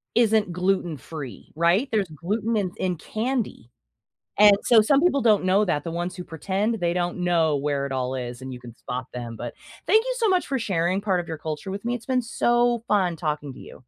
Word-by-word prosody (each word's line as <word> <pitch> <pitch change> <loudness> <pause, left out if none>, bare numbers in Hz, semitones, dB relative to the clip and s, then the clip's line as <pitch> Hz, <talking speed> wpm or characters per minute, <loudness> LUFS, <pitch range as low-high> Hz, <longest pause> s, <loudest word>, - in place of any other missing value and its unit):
isn't 220 -5 +3
gluten 180 -2 0
free, 135 - -9
right? 175 - +3
There's 205 -4 +1
gluten 210 +8 -2
in 185 -3 -1
in 180 -1 -1
candy, 220 - -3 0.7
and 205 -1 +8
so, 225 -3 +6
some 275 +6 +4
people 280 -6 +3
don't 210 -5 +3
know 195 +3 +4
that, 150 -5 0
the 165 - -4
ones 175 +2 -3
who 180 - -6
pretend, 195 +7 -2
they 170 -1 +1
don't 175 0 -2
know 165 -4 +2
where 140 0 -1
it 140 - -5
all 130 0 -2
is, 120 0 -5
and 130 0 -7
you 125 - -7
can 120 -2 -12
spot 125 +1 -5
them. 120 -2 -6
But, 120 - -6 0.3
thank 435 +6 +4
you - - -1
so 455 -3 +2
much 370 -2 +2
for 270 - 0
sharing 185 -3 0
part 190 -4 +1
of 170 - -5
your 160 -1 -5
culture 155 +5 -5
with 200 +3 -6
me, 240 - 0
it's 230 - -8
been 255 -1 +2
so 240 0 +1
fun 185 -5 +2
talking 150 -3 -3
to - - -13
you. - - -12
180 Hz, 225 wpm, -24 LUFS, 150-220 Hz, 0.7 s, and